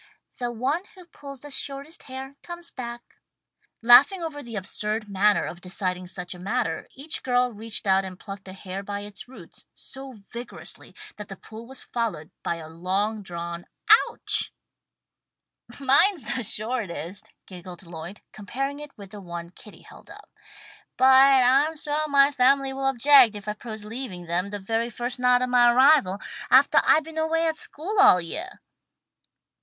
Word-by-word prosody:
"The 245 Hz, -1 st, -2 dB
one 260 Hz, +8 st, -1 dB
who 365 Hz, -2 st, -14 dB
pulls 280 Hz, -5 st, -11 dB
the 290 Hz, -, -9 dB
shortest 280 Hz, +4 st, -4 dB
hair 265 Hz, +1 st, -7 dB
comes 345 Hz, 0 st, -9 dB
back." 240 Hz, -1 st, -8 dB, 0.7 s
Laughing 280 Hz, +10 st, +7 dB
over 300 Hz, -3 st, -5 dB
the 235 Hz, -4 st, -9 dB
absurd 210 Hz, +2 st, -2 dB
manner 205 Hz, +1 st, +2 dB
of 175 Hz, -, -8 dB
deciding 180 Hz, -1 st, -3 dB
such 180 Hz, 0 st, -6 dB
a 180 Hz, -, -12 dB
matter, 185 Hz, -4 st, -2 dB
each 290 Hz, +4 st, -2 dB
girl 250 Hz, -1 st, +1 dB
reached 215 Hz, +1 st, -5 dB
out 190 Hz, 0 st, +3 dB
and 185 Hz, -1 st, -8 dB
plucked 195 Hz, -1 st, -9 dB
a 185 Hz, -, -8 dB
hair 190 Hz, 0 st, -7 dB
by 200 Hz, 0 st, -5 dB
its 205 Hz, +2 st, -10 dB
roots, 260 Hz, -, -13 dB
so 270 Hz, 0 st, -8 dB, 0.2 s
vigorously 240 Hz, +1 st, -9 dB, 0.2 s
that 210 Hz, -1 st, -8 dB
the 195 Hz, -, -8 dB
pull 220 Hz, +4 st, -11 dB
was 265 Hz, +1 st, -6 dB
followed 210 Hz, -10 st, -4 dB
by -, -, -2 dB
a 165 Hz, -2 st, -9 dB
long 190 Hz, +6 st, -2 dB
drawn 170 Hz, -2 st, -7 dB, 0.4 s
"ouch!" -, -, 0 dB, 1.3 s
"Mine's 275 Hz, -, +3 dB
the 260 Hz, -, -1 dB
shortest," 205 Hz, -, -4 dB, 0.2 s
giggled 180 Hz, -1 st, -11 dB
Lloyd, 170 Hz, +4 st, -9 dB
comparing 270 Hz, +7 st, -4 dB
it 295 Hz, -3 st, -11 dB
with 200 Hz, -2 st, -12 dB
the 205 Hz, -, -9 dB
one 170 Hz, -2 st, -7 dB
that 180 Hz, -, -29 dB
Kitty 210 Hz, -, -14 dB
held -, -, -16 dB
up. -, -, -14 dB, 0.7 s
"But 260 Hz, -, +3 dB, 0.4 s
I'm 280 Hz, +6 st, +3 dB
suah 300 Hz, +1 st, -2 dB
my 280 Hz, -1 st, +5 dB
family 270 Hz, 0 st, +2 dB
will 270 Hz, 0 st, -2 dB
object 270 Hz, -3 st, +6 dB
if 205 Hz, 0 st, -9 dB
I 210 Hz, -, -1 dB
propose 215 Hz, -1 st, -8 dB
leaving 215 Hz, -6 st, -7 dB
them 175 Hz, +3 st, -1 dB
the 205 Hz, -, -4 dB
very 225 Hz, +4 st, -2 dB
first 240 Hz, +2 st, -4 dB
night 250 Hz, 0 st, +4 dB
of 255 Hz, -, -1 dB
my 245 Hz, -1 st, +5 dB
arrival, 255 Hz, -7 st, +4 dB, 0.3 s
aftah -, -, +6 dB
I've 310 Hz, -, +4 dB
been 320 Hz, +1 st, -6 dB
away 325 Hz, +1 st, +1 dB
at 320 Hz, -1 st, -1 dB
school 390 Hz, +8 st, -3 dB
all 185 Hz, -, +8 dB
yeah." 320 Hz, -, -4 dB
235 Hz, 170 wpm, -25 LUFS, 195-275 Hz, 1.3 s, all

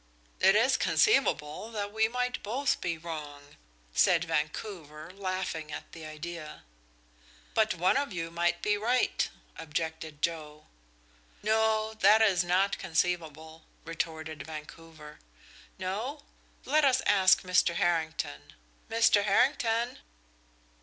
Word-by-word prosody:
"It 195 Hz, +1 st, +5 dB
is 235 Hz, +5 st, +4 dB
conceivable 220 Hz, -, +2 dB
that 205 Hz, -1 st, -4 dB
we 220 Hz, 0 st, +3 dB
might 250 Hz, +2 st, -2 dB
both 265 Hz, +7 st, -1 dB
be 170 Hz, -2 st, -2 dB
wrong," 150 Hz, -3 st, -8 dB, 0.4 s
said 175 Hz, -, +4 dB
Vancouver, 155 Hz, 0 st, -4 dB
laughing 185 Hz, -5 st, -4 dB
at -, -, -8 dB
the 160 Hz, -1 st, -9 dB
idea. 155 Hz, 0 st, -8 dB, 0.9 s
"But 220 Hz, -3 st, +2 dB
one 180 Hz, +8 st, +2 dB
of 280 Hz, -3 st, -1 dB
you 165 Hz, -2 st, -4 dB
might 175 Hz, +1 st, 0 dB
be 210 Hz, 0 st, +2 dB
right," 240 Hz, +4 st, +1 dB, 0.3 s
objected 160 Hz, -1 st, -5 dB
Joe. 155 Hz, -2 st, -3 dB, 0.8 s
"No 220 Hz, 0 st, +1 dB
that 215 Hz, +2 st, +6 dB
is 185 Hz, -5 st, +3 dB
not 185 Hz, +3 st, +1 dB
conceivable," 160 Hz, -2 st, -2 dB, 0.2 s
retorted 160 Hz, -2 st, -4 dB
Vancouver. 155 Hz, 0 st, -10 dB, 0.6 s
"No? 220 Hz, +11 st, -4 dB, 0.4 s
Let 305 Hz, +2 st, +3 dB
us 265 Hz, -2 st, +3 dB
ask 190 Hz, -2 st, +5 dB
Mr. 180 Hz, -2 st, +2 dB
Harrington. 160 Hz, -, -1 dB, 0.4 s
Mr. 225 Hz, -3 st, +4 dB
Harrington!" 230 Hz, +2 st, +1 dB
175 Hz, 110 wpm, -29 LUFS, 160-215 Hz, 0.9 s, that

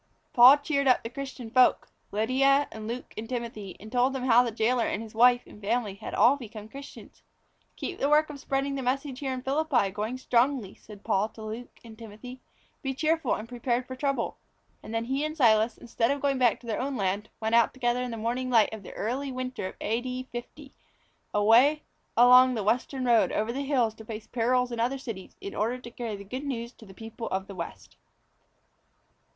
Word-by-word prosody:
Paul 255 Hz, +3 st, +9 dB
cheered 285 Hz, -1 st, -1 dB
up 255 Hz, -, +4 dB
the 230 Hz, -, -4 dB
other -, -, -27 dB
Christian 265 Hz, -4 st, -7 dB
folk 255 Hz, +1 st, +4 dB, 0.2 s
Lydia 275 Hz, +6 st, +3 dB
and 215 Hz, -1 st, -7 dB
Luke 240 Hz, +2 st, -6 dB
and 225 Hz, +1 st, -6 dB
Timothy 230 Hz, -6 st, -5 dB
and 215 Hz, +2 st, -11 dB
told 250 Hz, +2 st, +2 dB
them 265 Hz, -2 st, -3 dB
how 245 Hz, -1 st, +6 dB
the 245 Hz, -, -1 dB
jailor 230 Hz, +2 st, +1 dB
and -, -, -2 dB
his 220 Hz, -, -11 dB
wife 245 Hz, +2 st, +5 dB
and 210 Hz, -, -15 dB
family 215 Hz, 0 st, -1 dB
had 195 Hz, -, -7 dB
all 270 Hz, +4 st, +5 dB
become 215 Hz, -4 st, -9 dB
Christians. 275 Hz, +4 st, -12 dB, 0.5 s
"Keep 375 Hz, -, -5 dB
the 280 Hz, -, +1 dB
work 300 Hz, +1 st, +4 dB
of 285 Hz, -, -9 dB
spreading 275 Hz, +1 st, -1 dB
the 275 Hz, -, -3 dB
message 265 Hz, +1 st, -2 dB
here 270 Hz, -2 st, -3 dB
in 255 Hz, -1 st, -4 dB
Philippi 270 Hz, -7 st, +1 dB
going 215 Hz, +5 st, -3 dB
strongly," 250 Hz, -4 st, +1 dB
said 205 Hz, -2 st, -14 dB
Paul 210 Hz, -1 st, +1 dB
to 220 Hz, 0 st, -12 dB
Luke 220 Hz, +3 st, -7 dB
and 225 Hz, -1 st, -11 dB
Timothy. 235 Hz, +4 st, -10 dB, 0.4 s
"Be 270 Hz, -2 st, -3 dB
cheerfully 315 Hz, -6 st, 0 dB
prepared 245 Hz, +1 st, -2 dB
for 260 Hz, -, -7 dB
trouble." 275 Hz, +1 st, -2 dB, 0.4 s
And -, -, -10 dB
then 225 Hz, 0 st, -1 dB
he 270 Hz, +4 st, -1 dB
and 310 Hz, +1 st, -3 dB
Silas, 225 Hz, -4 st, +4 dB
instead 230 Hz, 0 st, -1 dB
of 280 Hz, +1 st, 0 dB
going 275 Hz, -1 st, 0 dB
back 245 Hz, -3 st, +3 dB
to -, -, -15 dB
their 225 Hz, 0 st, -2 dB
own 270 Hz, 0 st, -2 dB
land, 200 Hz, +1 st, -1 dB
went 220 Hz, 0 st, -2 dB
out 235 Hz, -1 st, +5 dB
together 245 Hz, -1 st, 0 dB
in 250 Hz, -, -3 dB
the 230 Hz, -, -5 dB
morning 240 Hz, +3 st, -2 dB
light 225 Hz, -3 st, +4 dB
of 220 Hz, -, -7 dB
the 190 Hz, -, -10 dB
early 265 Hz, +6 st, -3 dB
winter 255 Hz, -5 st, -4 dB
of -, -, -9 dB
A.D. 250 Hz, +3 st, -3 dB
50, 270 Hz, +4 st, -9 dB, 0.6 s
away 240 Hz, +9 st, +4 dB, 0.3 s
along 250 Hz, +1 st, +7 dB
the 215 Hz, -, -2 dB
Western 250 Hz, +5 st, 0 dB
road 235 Hz, -2 st, +4 dB
over 220 Hz, +2 st, -1 dB
the 275 Hz, -, -3 dB
hills 260 Hz, -6 st, +1 dB
to 220 Hz, 0 st, -13 dB
face 215 Hz, -1 st, -7 dB
perils 250 Hz, +1 st, +1 dB
in 235 Hz, -, -4 dB
other 250 Hz, +4 st, 0 dB
cities 225 Hz, -8 st, -8 dB
in 200 Hz, -, -6 dB
order 230 Hz, +4 st, -1 dB
to 240 Hz, -1 st, -11 dB
carry 230 Hz, -3 st, -5 dB
the 200 Hz, -, -9 dB
Good 255 Hz, +8 st, -6 dB
News 235 Hz, -4 st, -4 dB
to 220 Hz, -, -16 dB
the 190 Hz, -, -14 dB
people 225 Hz, +1 st, -7 dB
of 190 Hz, 0 st, -2 dB
the 200 Hz, -, -9 dB
West. 170 Hz, -3 st, -8 dB
245 Hz, 215 wpm, -27 LUFS, 220-265 Hz, 0.6 s, Paul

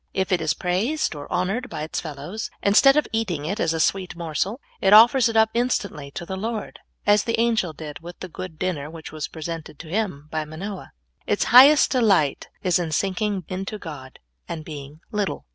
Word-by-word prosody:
If 190 Hz, 0 st, 0 dB
it 180 Hz, -, +2 dB
is 160 Hz, -, 0 dB
praised 200 Hz, -, 0 dB
or 145 Hz, -1 st, -9 dB
honored 195 Hz, +8 st, -1 dB
by 150 Hz, -, -5 dB
its 155 Hz, -, -3 dB
fellows, 155 Hz, +7 st, -6 dB
instead 275 Hz, +8 st, +6 dB
of 300 Hz, -, +2 dB
eating 185 Hz, -10 st, -1 dB
it 200 Hz, +7 st, -3 dB
as 165 Hz, -, +1 dB
a 165 Hz, -, -2 dB
sweet 185 Hz, +2 st, 0 dB
morsel, 175 Hz, -, -2 dB, 0.2 s
it 195 Hz, +1 st, +4 dB
offers 235 Hz, +3 st, +7 dB
it 225 Hz, -, -1 dB
up 220 Hz, 0 st, +5 dB
instantly 205 Hz, -, -1 dB
to 175 Hz, -, -5 dB
the 190 Hz, -, -5 dB
Lord, 220 Hz, +3 st, -4 dB, 0.3 s
as 205 Hz, 0 st, +4 dB
the 230 Hz, -1 st, 0 dB
angel 225 Hz, -7 st, +2 dB
did 150 Hz, -1 st, -8 dB
with 175 Hz, +1 st, -11 dB
the 185 Hz, -, -6 dB
good 180 Hz, -1 st, -8 dB
dinner 155 Hz, -6 st, -2 dB
which 160 Hz, -1 st, -9 dB
w^as 155 Hz, -1 st, -5 dB
presented 160 Hz, -2 st, -6 dB
to 160 Hz, -, -10 dB
him 180 Hz, -7 st, -2 dB
by 155 Hz, -1 st, -1 dB
Manoah. 180 Hz, +6 st, -7 dB, 0.3 s
Its 205 Hz, -, +1 dB
highest 280 Hz, +4 st, +8 dB
delight 195 Hz, -, +2 dB
is 180 Hz, -1 st, +2 dB
in 165 Hz, -2 st, -3 dB
sinking 195 Hz, +3 st, -1 dB
into 195 Hz, +3 st, -4 dB
God 145 Hz, -8 st, -9 dB, 0.3 s
and 160 Hz, -2 st, -5 dB
being 145 Hz, 0 st, -9 dB
little. 205 Hz, -2 st, -2 dB
185 Hz, 195 wpm, -23 LUFS, 155-215 Hz, 0.3 s, highest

